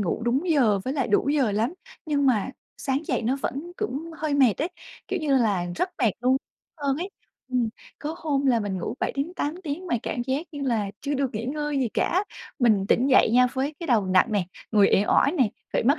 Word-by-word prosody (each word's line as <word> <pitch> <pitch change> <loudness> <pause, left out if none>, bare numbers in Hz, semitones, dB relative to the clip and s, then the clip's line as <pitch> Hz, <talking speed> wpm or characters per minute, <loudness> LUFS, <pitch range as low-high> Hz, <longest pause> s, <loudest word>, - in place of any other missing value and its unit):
ngủ 200 +3 -1
đúng 270 +9 +1
giờ 235 -10 +4
với 260 - -1
lại 270 -4 0
đủ 210 +6 +2
giờ 275 -8 +2
lắm 225 - 0 0.3
nhưng 285 -2 +1
mà 230 -3 +2 0.3
sáng 270 0 -1
dậy 250 -3 0
nó 255 +5 +1
vẫn 310 +8 -4
cũng 330 -5 -3
hơi 305 -2 -1
mệt 260 -7 +5
ấy, 330 - 0 0.4
kiểu 385 - -1
như 285 -3 +2
là, 205 -7 +1
rất 365 - 0
mệt 230 - +5
luôn 255 +2 +3 0.5
hơn 275 -1 +1
ấy. 360 +5 -4 0.4
Ừm, 250 -3 +1 0.3
có 300 +2 -4
hôm 285 -4 0
là 240 -3 +4
mình 200 -3 -2
ngủ 215 - -3
7-8 295 +1 -2
tiếng 330 +3 -4
mà 330 - +1
cảm 240 - -2
giác 265 +7 -2
như 290 - -6
là 225 -7 0
chưa 290 0 -2
được 275 -2 0
nghỉ 215 +2 -3
ngơi 295 +2 -2
gì 255 -3 +1
cả, 375 +3 +1 0.3
mình 215 -7 +3
tỉnh 250 - +3
dậy 255 - +6
nha 250 +1 +6
với 275 +3 -2
cái 335 - -4
đầu 225 -7 +3
nặng 185 0 +4
nè, 200 -3 +1 0.3
người 205 -2 +6
uể 200 - +4
oải 285 - +4
nè, 260 -10 +3 0.2
phải - - +1
mất 280 +7 +3
265 Hz, 225 wpm, -25 LUFS, 230-295 Hz, 0.5 s, dậy